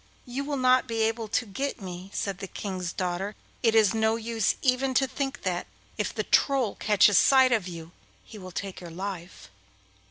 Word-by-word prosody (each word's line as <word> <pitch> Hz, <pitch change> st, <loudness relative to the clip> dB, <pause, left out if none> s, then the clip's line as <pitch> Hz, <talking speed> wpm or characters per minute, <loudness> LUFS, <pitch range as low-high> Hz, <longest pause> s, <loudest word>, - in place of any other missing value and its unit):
you 255 Hz, +2 st, -4 dB
will 285 Hz, 0 st, -2 dB
not 255 Hz, 0 st, +4 dB
be 225 Hz, -2 st, 0 dB
able 225 Hz, 0 st, -1 dB
to 230 Hz, +3 st, 0 dB
get 250 Hz, +7 st, -3 dB
me,' 185 Hz, -1 st, -8 dB
said 195 Hz, -3 st, -3 dB
the 195 Hz, -, -5 dB
King's 185 Hz, -3 st, -4 dB
daughter. 185 Hz, +3 st, -3 dB, 0.3 s
'It 225 Hz, -2 st, +3 dB
is 215 Hz, -4 st, +5 dB
no 220 Hz, 0 st, +2 dB
use 225 Hz, -2 st, 0 dB
even 260 Hz, 0 st, +2 dB
to 270 Hz, -, +4 dB
think 270 Hz, +1 st, -3 dB
of -, -, -26 dB
that; -, -, -2 dB, 0.3 s
if -, -, -2 dB
the -, -, -2 dB
Troll 270 Hz, -7 st, +2 dB
catches 205 Hz, -1 st, +4 dB
sight 260 Hz, -1 st, +5 dB
of 215 Hz, -6 st, +1 dB
you 165 Hz, -2 st, -8 dB, 0.3 s
he 215 Hz, -, -12 dB
will 185 Hz, -1 st, -9 dB
take 190 Hz, +1 st, -6 dB
your 175 Hz, -, -8 dB
life. 180 Hz, -, -7 dB
220 Hz, 195 wpm, -27 LUFS, 190-255 Hz, 0.3 s, is